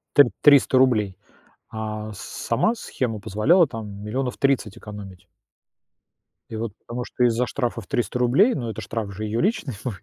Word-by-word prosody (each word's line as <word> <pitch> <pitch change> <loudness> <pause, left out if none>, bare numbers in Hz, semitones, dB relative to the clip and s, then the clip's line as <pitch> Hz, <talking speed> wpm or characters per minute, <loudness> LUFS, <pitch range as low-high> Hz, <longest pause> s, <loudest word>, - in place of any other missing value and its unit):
т 145 - +10 0.2
триста 140 -3 +6
рублей, 110 -7 +3 0.5
а 110 -1 -5
с-сама 115 - -1
схема 125 - -3
позволяла, 160 - +3
там, 105 -4 -7
30000000 125 -1 0
экономить. 100 -3 -10 1.2
И 110 - -5
вот, 110 -1 -3
потому 120 +1 -6
что 125 - -1
из-за 120 +1 +2
штрафа 120 -3 -2
в 100 - -14
300 120 +4 -1
рублей, 135 - +4
ну, 120 -4 -3
это 110 - -6
штраф 105 -1 -4
же 105 +3 -5
её 110 +2 -1
личный 185 - 0
будет. 110 -8 -5
115 Hz, 155 wpm, -23 LUFS, 105-130 Hz, 1.2 s, т